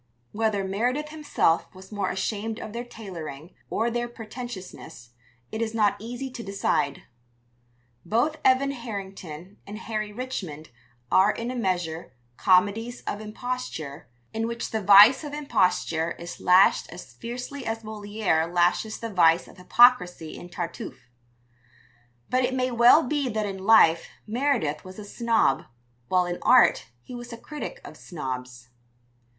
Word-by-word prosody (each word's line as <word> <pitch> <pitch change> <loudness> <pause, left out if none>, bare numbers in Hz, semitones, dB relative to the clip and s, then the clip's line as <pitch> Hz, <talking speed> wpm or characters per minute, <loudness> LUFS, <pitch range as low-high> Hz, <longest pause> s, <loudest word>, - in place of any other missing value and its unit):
Whether 215 -2 0
Meredith 245 +10 -1
himself 300 - 0
was 190 +2 -13
more 200 -3 -2
ashamed 215 +3 -3
of 210 - -7
their 235 +1 -4
tailoring 175 - -9 0.2
or 230 +2 0
their 240 +1 -1
pretentiousness 215 - -9 0.4
it 220 - -4
is 225 0 -2
not 210 -2 +3
easy 245 +4 -6
to 245 - -7
decide. 195 -8 -1 1.0
Both 270 +8 0
Evan 265 +1 +4
Harrington 195 - -8
and 205 +1 -7
Harry 215 -2 -4
Richmond 190 - -6 0.4
are 190 +2 +5
in 230 +3 -2
a - - -5
measure, 175 - -2 0.2
comedies 205 - +2
of 205 - -4
imposture, 215 - -5 0.3
in 225 +1 -1
which 235 0 -4
the 220 - -1
vice 205 - +8
of 295 -1 -7
imposture 180 - 0
is 170 +1 -9
lashed 185 +2 +4
as 175 +2 -11
fiercely 250 +4 -6
as 225 0 -3
Molière 205 -6 -1
lashes 180 +5 +1
the 230 -2 -6
vice 165 -2 +4
of - - -16
hypocrisy 180 -5 +4
in 175 - -10
Tartuffe. 165 -7 -7 1.2
But 255 0 +1
it 255 +1 0
may 255 0 0
well 240 +6 +6
be 285 -1 -1
that 215 -2 -1
in 195 -1 -5
life 170 -7 +6 0.2
Meredith 230 - 0
was 185 0 -11
a 210 - -8
snob, 225 - +1 0.4
while 180 +4 +2
in 175 0 -4
art 250 0 +5 0.2
he - - -11
was 240 0 -8
a 230 - -7
critic 300 - -7
of - - -10
snobs. 125 -6 -7
215 Hz, 145 wpm, -26 LUFS, 180-240 Hz, 1.2 s, vice